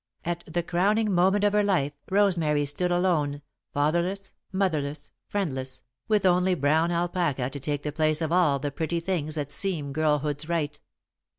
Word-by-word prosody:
At 175 0 -2
the 170 +2 -1
crowning 200 +5 +1
moment 190 +3 +3
of 205 0 +3
her 210 - +4
life, 175 -9 +1 0.2
Rosemary 170 -7 +2
stood 175 +5 -1
alone, 155 -6 +1 0.3
fatherless, 175 +7 0 0.2
motherless, 155 -7 -1 0.2
friendless, 130 -10 -3 0.2
with 210 -3 +2
only 180 0 +3
brown 155 +3 +2
alpaca 170 -7 0
to 140 - -6
take 145 +1 -3
the 150 - -2
place 155 0 +1
of 160 -1 -2
all 170 -6 +4
the 145 +1 -3
pretty 165 +4 -2
things 165 -3 -2
that 145 -2 -3
seem 150 -5 -2
girlhood's 150 0 0
right. 150 -3 -1
165 Hz, 160 wpm, -26 LUFS, 145-185 Hz, 0.3 s, her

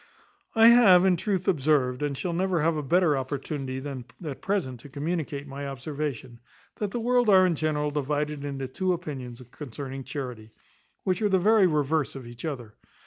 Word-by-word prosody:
I 225 +1 +8
have, 200 -7 +7
in 185 -1 +4
truth, 190 +1 -2
observed, 140 -6 +2
and 145 -2 -2
shall 175 +3 -2
never 185 0 0
have 165 +1 +2
a 150 - -1
better 165 +2 +3
opportunity 135 0 -4
than 130 -3 -6 0.2
at 145 -3 -6
present 175 -12 -2
to 145 - -13
communicate 145 -1 -3
my 140 0 -6
observation, 135 -3 -5 0.4
that 210 - -2
the 240 - -3
world 245 0 +2
are 190 -2 +7
in 180 - +2
general 150 -1 -1
divided 150 0 -2
into 135 -2 -4
two 185 +7 -1
opinions 130 -8 -6
concerning 135 -1 -7
charity, 125 -6 -7 0.5
which 185 +3 0
are 210 - +2
the 190 - +4
very 205 +1 +5
reverse 150 -2 0
of 135 -2 -8
each 120 +4 -9
other. 125 -9 -5
150 Hz, 180 wpm, -27 LUFS, 135-180 Hz, 0.5 s, I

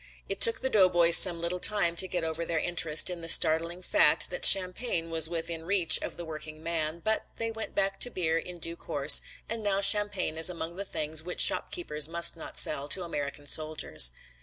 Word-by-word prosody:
It - - -6
took 460 -1 +5
the 265 - -1
doughboys 175 -4 +4
some 175 -2 +6
little 170 +2 -4
time 175 -4 +2
to 185 - +6
get 175 -2 -5
over 160 +1 -5
their 165 0 -4
interest 165 0 0
in 175 -1 -8
the 165 - -6
startling 165 +3 +4
fact 310 - +1
that - - -7
champagne 185 -2 +3
was 160 -1 +4
within 165 -1 -5
the 160 - -15
reach 185 -4 +3
of - - -8
the 170 - -8
working 155 0 -11
man, 165 0 -5
but 220 0 -2
they 225 0 -5
went 225 0 -9
back 195 0 -2
to 245 - +1
beer 165 -6 -3
in 180 +1 -10
due 170 0 -5
course 145 -3 +2 0.3
and 230 0 -5
now 200 -2 -2
champagne 200 -5 -1
is 165 - +4
among 170 -1 -8
the 200 +2 -7
things 155 -3 -3
which 180 +2 -9
shopkeepers 155 - -1
must 170 +1 0
not 165 - -12
sell 145 -1 -2
to 185 +4 +1
American 145 -3 -7
soldiers. 150 - +1
170 Hz, 210 wpm, -26 LUFS, 160-190 Hz, 0.3 s, some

